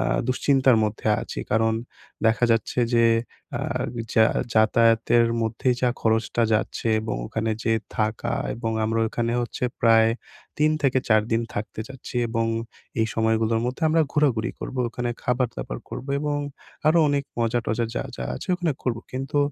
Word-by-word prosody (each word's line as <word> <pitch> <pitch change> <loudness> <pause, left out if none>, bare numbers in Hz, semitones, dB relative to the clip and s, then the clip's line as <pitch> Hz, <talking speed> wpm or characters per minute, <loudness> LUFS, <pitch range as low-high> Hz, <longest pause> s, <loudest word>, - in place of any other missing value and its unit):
আ - - +1 0.3
দুশ্চিন্তার 130 -1 +3
মধ্যে 105 +1 -2
আছি। - - -7
কারণ 110 +1 +3 0.5
দেখা 115 +2 +3
যাচ্ছে 115 +2 0 0.2
যে 115 0 +5 0.5
আ - - -3 0.5
যা 110 - +6 0.3
যাতায়াতের 115 +1 +4 0.2
মধ্যেই 120 +3 0
যা 125 - +4
খরচটা 115 +1 +1
যাচ্ছে 110 +1 -1
এবং 110 0 -3
ওখানে 110 0 -2
যেয়ে 115 -1 +1 0.2
থাকা 110 +1 0 0.2
এবং 115 -1 -3
আমরা 115 +1 0
ওখানে 115 +1 -1
হচ্ছে 120 - -4 0.2
প্রায় 115 -1 +5 0.5
৩ 155 +1 +4
থেকে 130 -2 +3
৪ 110 -1 +5
দিন 115 +1 +2
থাকতে 110 +1 -4
চাচ্ছি 135 -2 -8
এবং 115 0 0 0.5
এই 110 - +3
সময়গুলোর 110 0 +1
মধ্যে 125 +7 -4
আমরা 160 +1 +4
ঘোরাঘুরি 125 -7 +1
করবো, 130 -1 -3
ওখানে 120 +1 -3
খাবার-দাবার 125 - -2
করবো 135 - -6
এবং 150 -1 -1 0.5
আরও 165 +2 +5
অনেক 140 -1 0 0.2
মজা-টজা 115 0 0
যা, - - -1
যা 60 - -4
আছে - - -8
ওখানে 175 -4 0
করবো। 115 -3 -1
কিন্তু 135 +2 -2
115 Hz, 155 wpm, -24 LUFS, 110-130 Hz, 0.5 s, যা